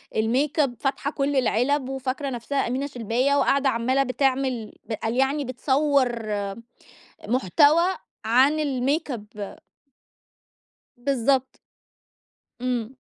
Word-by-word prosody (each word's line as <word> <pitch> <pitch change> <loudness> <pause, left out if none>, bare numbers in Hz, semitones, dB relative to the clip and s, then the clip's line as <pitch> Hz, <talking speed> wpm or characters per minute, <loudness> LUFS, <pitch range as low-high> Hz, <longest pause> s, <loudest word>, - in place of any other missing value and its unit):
الmakeup، 275 +6 +2
فاتحة 280 +1 -1
كلّ 280 -1 -1
العلب 260 +2 +1
وفاكرة 270 +1 -3
نفْسها 265 +3 -2
أمينة 265 +4 -2
شلباية 250 +2 0
وقاعدة 275 -1 +3
عمّالة 255 +3 +1
بتعمل 255 -3 -1 0.2
ب - - -1
قال 225 +2 -2
يعني 270 +2 +1
بتصوَّر 260 -2 +1 1.0
محتوى 290 - +3 0.3
عن 260 +7 +4
الmakeup 255 - -2 1.4
بالضبط. 265 +1 0 1.0
إمم. 250 0 -2
265 Hz, 90 wpm, -24 LUFS, 240-280 Hz, 1.4 s, عن